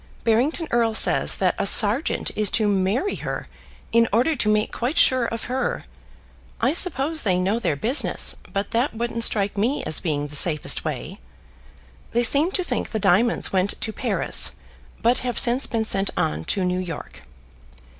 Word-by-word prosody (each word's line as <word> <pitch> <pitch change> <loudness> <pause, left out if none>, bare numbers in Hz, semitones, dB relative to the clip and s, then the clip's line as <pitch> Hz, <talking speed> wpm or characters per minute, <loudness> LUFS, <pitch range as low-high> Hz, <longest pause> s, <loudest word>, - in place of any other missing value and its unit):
Barrington 250 +9 +1
Erle 230 -2 +1
says - - +4
that - - 0
a - - 0
sergeant - - +2
is 210 -2 +2
to 215 -2 +1
marry 205 - 0
her - - -5 0.5
in 230 0 +3
order 250 +9 +1
to 230 -5 -1
make 215 0 +1
quite 255 +7 -3
sure 260 -7 +4
of 230 0 -5
her. 260 +2 -3 0.8
I - - +1
suppose 315 -3 +1
they 185 -5 0
know 195 +5 0
their 190 - -1
business; 230 - 0 0.2
but 200 0 -3
that 240 +2 -1
wouldn't 230 0 -2
strike 205 -2 0
me 250 +8 0
as 155 - 0
being 145 -3 -2
the 150 - -9
safest 155 0 +2
way. - - -6 0.9
They 240 +1 +1
seem 285 +8 +4
to 370 - +2
think - - -3
the 220 - -3
diamonds 200 +5 +2
went 190 +1 0
to 220 - -2
Paris - - +2 0.5
but 240 +2 +2
have 245 -1 -4
since 245 +3 +3
been 225 -1 -2
sent 195 -2 0
on 75 +1 -2
to 190 -2 -1
New 180 0 -1
York. 175 -4 -8
225 Hz, 175 wpm, -22 LUFS, 195-250 Hz, 0.9 s, says